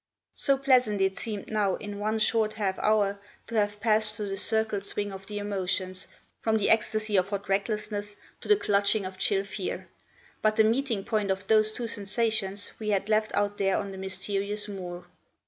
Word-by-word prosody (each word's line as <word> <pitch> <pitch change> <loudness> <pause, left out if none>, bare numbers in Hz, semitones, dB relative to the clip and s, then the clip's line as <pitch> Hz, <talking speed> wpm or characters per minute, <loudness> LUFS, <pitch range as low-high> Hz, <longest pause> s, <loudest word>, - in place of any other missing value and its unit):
So 275 -1 +2
pleasant 255 -6 +3
it 190 0 +1
seemed 215 -3 -5
now, 205 -3 +2
in 205 -1 -6
one 215 +1 0
short 215 0 +2
half 195 -3 -1
hour, 205 -2 +2 0.2
to - - -10
have 210 -1 +1
passed 215 0 +2
through 210 -2 -4
the 195 - -2
circle 220 -1 0
swing 205 0 -3
of 195 0 -9
the 210 - -5
emotions, 190 -2 -2 0.3
from 220 -1 +2
the 210 - +2
ecstasy 215 -1 +2
of 185 +1 +2
hot 200 -1 -3
recklessness 205 +1 -1 0.2
to - - -10
the 420 - +7
clutching 200 - +2
of 185 0 -7
chill 195 -1 +2
fear. 200 -1 -5 0.5
But 215 0 +3
the 220 - +6
meeting 230 -2 +1
point 210 -2 0
of 190 +1 -1
those 215 +1 +4
two 235 +2 -4
sensations 205 -2 -1
we 215 -1 -3
had 200 0 +1
left 215 0 +3
out 205 0 0
there 195 -1 +2
on 200 -1 -3
the 190 - -8
mysterious 200 +2 -3
moor! 180 -3 -6
205 Hz, 190 wpm, -28 LUFS, 195-215 Hz, 0.5 s, the